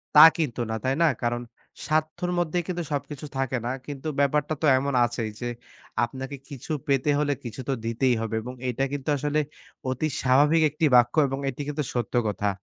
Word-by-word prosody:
তা 150 - +12
কিন্তু 135 -7 -1
না, - - -1
তাই 130 +1 +1
না? - - +6 0.2
কারণ 120 0 0 0.4
স্বার্থর 155 +3 0
মধ্যে 175 0 0
কিন্তু 175 -2 -2
সবকিছু 145 +1 -4
থাকে 130 -1 0
না। 125 - 0
কিন্তু 145 +1 -6
ব্যাপারটা 150 +2 +2
তো 155 - +1
এমন 140 +1 -1
আছেই। 115 -2 -3
যে 120 - -2 0.5
আপনাকে 135 +3 -4
কিছু 140 +2 -8 0.2
পেতে 140 +1 +2
হলে 145 -1 +1
কিছু 120 +2 -6
তো - - +2
দিতেই 120 +2 +2
হবে। 110 0 -2
এবং 125 +3 -7 0.2
এটা 125 +3 -1
কিন্তু 145 +1 -3
আসলে 150 +2 0 0.5
অতি 130 +4 0
স্বাভাবিক 145 +5 +4
একটি 155 +2 0
বাক্য 120 +3 +5
এবং 135 +1 -3
এটি 135 - -6
কিন্তু 150 0 -2
সত্য 120 0 -2
কথা। 105 0 0
135 Hz, 185 wpm, -26 LUFS, 125-150 Hz, 0.5 s, তা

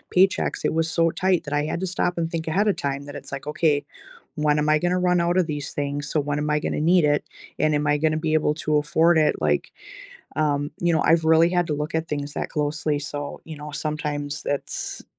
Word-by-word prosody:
paychecks, 190 +1 +2
it - - +1
was 165 0 +1
so 165 -1 +2
tight 185 -1 +1
that 145 - -5
I 145 0 +1
had 155 - -2
to 190 - -1
stop 180 -1 -1
and 165 -1 -1
think 165 -1 -3
ahead 195 +7 +1
of 205 - +3
time 140 0 -2
that 145 0 -9
it's 140 -1 -9
like, 135 - -6
"Okay, 150 -1 +1 0.5
when 150 0 +2
am 150 - 0
I 155 0 +4
gonna 175 +2 +1
run 180 -1 +2
out 175 +1 +1
of 180 -3 +3
these 145 -3 -4
things? 145 0 -3
So 155 - +1
when 145 0 -1
am 150 0 -2
I 150 - +2
gonna 150 - -2
need 170 +1 +4
it? 145 0 +2 0.4
And 155 - +2
am 145 0 0
I 145 0 +3
gonna 155 +1 +1
be 155 0 -1
able 150 -1 +2
to 155 -1 0
afford 160 +3 +3
it?" 155 -1 +3
Like, - - 0 0.6
um, 145 -1 0
you 175 -1 +2
know, 160 - +2
I've 165 -1 +3
really 160 +1 +5
had 175 -1 +1
to 150 - -1
look 150 +1 -4
at 160 0 -1
things 145 -1 -4
that - - -3
closely, 150 0 -1
so, 145 0 -6
you 160 -2 -8
know, 150 0 -8
sometimes 145 0 -3
that's 145 - -4
155 Hz, 245 wpm, -24 LUFS, 145-165 Hz, 0.6 s, really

